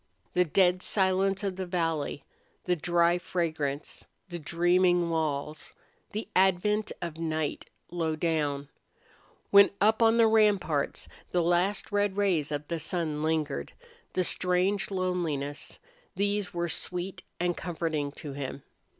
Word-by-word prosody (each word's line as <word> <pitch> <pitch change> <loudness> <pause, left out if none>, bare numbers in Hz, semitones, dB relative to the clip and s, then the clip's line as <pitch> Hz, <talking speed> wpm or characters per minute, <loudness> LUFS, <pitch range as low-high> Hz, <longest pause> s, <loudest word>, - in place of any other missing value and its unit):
The 180 0 +3
dead 180 +2 +3
silence 195 0 +1
of 195 -2 -2
the 190 - -3
valley, 165 -5 -1 0.4
the 180 - +1
dry 170 +1 +2
fragrance, 160 -5 -3 0.3
the 175 -1 -5
dreaming 175 +2 +2
walls, 155 -2 -2 0.4
the 215 +2 -4
advent 195 +3 +2
of 165 -2 -5
night 160 -2 -2 0.2
low 165 -3 -1
down, 150 -3 -1 0.8
when 200 0 +8
up 220 +2 +3
on 225 0 +5
the 230 - +6
ramparts 205 -9 +2 0.2
the 175 -1 +1
last 180 +5 +1
red 205 -1 +1
rays 175 -8 +1
of 145 0 -3
the 170 -1 -2
sun 160 -1 -2
lingered, 155 -2 -1 0.4
the 185 - +1
strange 180 +3 +1
loneliness 175 -7 -2 0.4
these 205 -1 0
were 175 0 -2
sweet 180 +2 -4 0.2
and 175 0 0
comforting 160 -4 -2
to 145 -2 -7
him. 140 0 -6
175 Hz, 130 wpm, -28 LUFS, 155-190 Hz, 0.8 s, when